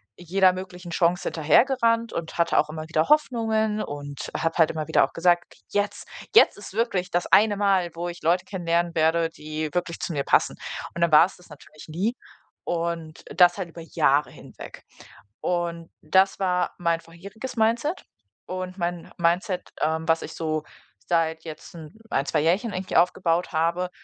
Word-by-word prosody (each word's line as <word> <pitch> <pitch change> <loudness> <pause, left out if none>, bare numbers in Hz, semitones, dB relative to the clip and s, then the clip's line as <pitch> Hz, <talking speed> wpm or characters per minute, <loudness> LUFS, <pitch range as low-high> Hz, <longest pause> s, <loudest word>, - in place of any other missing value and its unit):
jeder 185 +2 +3
möglichen 180 -1 -8
Chance 175 +1 +1
hinterhergerannt 230 - +2
und 165 0 -5
hatte 170 0 +3
auch 155 - +1
immer 155 0 -6
wieder 155 0 0
Hoffnungen 220 -7 +2
und 145 -1 -6
habe 165 0 0
halt 160 - +5
immer 155 -1 -4
wieder 160 - +4
auch - - -13
gesagt: 175 +1 +1 0.2
„Jetzt 205 0 -2 0.3
jetzt 445 - +7
ist 205 -1 -11
wirklich 200 -5 -1
das 175 0 0
eine 210 -1 +5
Mal, 195 -3 +2
wo 175 +1 -3
ich 175 - -9
Leute 175 +3 +2
kennenlernen 170 -2 -1
werde, 165 +1 +2
die 155 0 -5
wirklich 175 -1 -2
zu 170 - -3
mir 140 -2 -1
passen.“ - - +2 0.4
Und 170 - -5
dann 170 -1 +3
war's 165 +5 +5
das 175 -1 -19
natürlich 150 +1 -14
nie 185 +9 -1 0.5
und 165 -2 -3
das 175 0 +6
halt 185 -3 -4
über 165 0 -10
Jahre 150 -2 +1
hinweg. - - -12 0.6
Und 170 -1 -2
das 190 +6 +3
war 180 -2 0
mein 170 -1 0
vorheriges 200 +10 -9
Mindset. 235 +10 0 0.4
Und 185 +1 -5
mein 175 -1 -4
Mindset, 180 +2 0
ähm, 160 +1 0
was 165 0 +3
ich - - -7
so 155 -1 -2 0.5
seit 160 -1 0
jetzt 155 -2 -10
'n 155 -2 -10 0.2
1, 140 - 0
2 155 - +1
Jährchen 190 +8 +1
eigentlich 185 +1 -2
aufgebaut 175 0 +2
habe, 170 +3 0
175 Hz, 170 wpm, -25 LUFS, 160-190 Hz, 0.6 s, jetzt